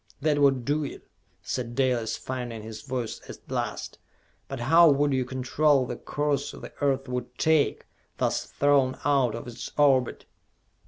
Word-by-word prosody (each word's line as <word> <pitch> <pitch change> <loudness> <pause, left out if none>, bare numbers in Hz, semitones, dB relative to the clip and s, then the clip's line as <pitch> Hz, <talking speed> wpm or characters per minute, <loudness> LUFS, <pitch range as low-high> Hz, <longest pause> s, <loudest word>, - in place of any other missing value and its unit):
"That 150 0 +1
would 135 -4 +3
do 150 +2 +1
it," 140 - -8 0.4
said 120 -2 -4
Dalis, 125 -4 +1
finding 120 -4 -5
his 110 0 -8
voice 130 -5 -4
at - - -7
last; - - -3 0.5
"but 135 -3 -6
how 165 +6 +6
would 145 0 +2
you 130 -1 +1
control 130 +2 +2
the 120 - -4
course 145 0 -2
the - - -10
Earth 135 -1 +1
would 125 -1 -5
take, 160 -2 +2 0.3
thus - - 0
thrown 140 -2 +2
out 135 -6 +2
of 115 - -7
its 120 - -7
orbit?" 135 -4 +3
135 Hz, 155 wpm, -27 LUFS, 125-145 Hz, 0.5 s, how